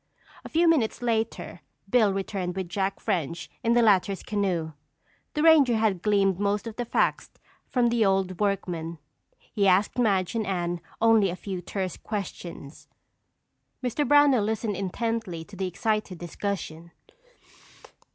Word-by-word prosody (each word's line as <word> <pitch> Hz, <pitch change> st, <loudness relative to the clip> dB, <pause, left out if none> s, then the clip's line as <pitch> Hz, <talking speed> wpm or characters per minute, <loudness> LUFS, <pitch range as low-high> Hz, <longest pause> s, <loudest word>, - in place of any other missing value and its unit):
A -, -, -9 dB
few 335 Hz, +2 st, +3 dB
minutes 255 Hz, -7 st, +2 dB
later 225 Hz, -1 st, -2 dB, 0.3 s
Bill 225 Hz, -5 st, +4 dB
returned 190 Hz, -2 st, -3 dB
with 190 Hz, -2 st, -3 dB
Jack 195 Hz, +2 st, -2 dB
French 170 Hz, -5 st, -2 dB
in 230 Hz, -, +3 dB
the 240 Hz, 0 st, +4 dB
latter's 195 Hz, -2 st, +3 dB
canoe. 185 Hz, -6 st, -1 dB, 0.6 s
The 300 Hz, -, +1 dB
ranger 300 Hz, -7 st, +6 dB
had 210 Hz, -5 st, +1 dB
gleaned 195 Hz, -3 st, +2 dB
most 205 Hz, +1 st, 0 dB
of 225 Hz, -2 st, -6 dB
the 245 Hz, -, -3 dB
facts -, -, 0 dB, 0.4 s
from 245 Hz, -2 st, +2 dB
the 235 Hz, -1 st, +2 dB
old 190 Hz, -2 st, +1 dB
workman. 175 Hz, -5 st, -2 dB, 0.6 s
He 200 Hz, -3 st, +2 dB
asked 195 Hz, +6 st, +3 dB
Madge 195 Hz, -5 st, +2 dB
and 220 Hz, -3 st, -2 dB
Anne 175 Hz, -2 st, -2 dB, 0.2 s
only 225 Hz, -3 st, +4 dB
a 175 Hz, -, -3 dB
few, 185 Hz, -1 st, -5 dB
terse 185 Hz, 0 st, -4 dB
questions. 175 Hz, -7 st, -7 dB, 1.0 s
Mr. 250 Hz, +4 st, 0 dB
Brownell 290 Hz, -6 st, +5 dB
listened 215 Hz, 0 st, -1 dB
intently 200 Hz, -2 st, -3 dB
to 200 Hz, +4 st, -14 dB
the 190 Hz, 0 st, -2 dB
excited 200 Hz, +1 st, -2 dB
discussion. 170 Hz, -1 st, -5 dB
200 Hz, 140 wpm, -26 LUFS, 185-225 Hz, 1.0 s, ranger